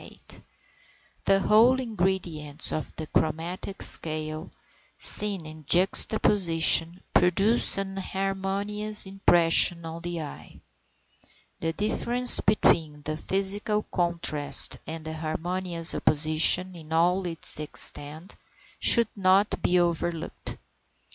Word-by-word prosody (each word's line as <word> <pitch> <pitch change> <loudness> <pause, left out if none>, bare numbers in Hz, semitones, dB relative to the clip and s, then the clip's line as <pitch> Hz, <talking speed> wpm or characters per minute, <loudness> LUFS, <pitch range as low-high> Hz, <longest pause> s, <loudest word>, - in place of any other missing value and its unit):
The 195 0 +1
whole 235 +6 +2
ingredients 175 - -3
of 155 - -6
the 155 - -7
chromatic 165 +6 -4
scale, 155 +1 -1 0.5
seen 200 -5 +1
in 155 0 -13
juxtaposition, 180 -2 +3
produce 195 +6 +1
an 195 0 -6
harmonious 195 +2 -3
impression 175 -3 +2
on 165 +1 -9
the 175 -1 -6
eye. 145 - -13 1.0
The 165 0 -4
difference 240 +5 +6
between 155 -7 -1
the 155 +1 -5
physical 200 +5 -3
contrast 170 -4 +1
and 160 -1 -8
harmonious 165 +2 -2
opposition 155 +4 +1
in 160 -2 -15
all 175 +3 -1
its 165 -2 +3
extent 155 +3 -1 0.4
should 235 -2 +4
not 195 +1 0
be 180 - 0
overlooked. 170 -1 -4
175 Hz, 95 wpm, -24 LUFS, 160-195 Hz, 1.0 s, difference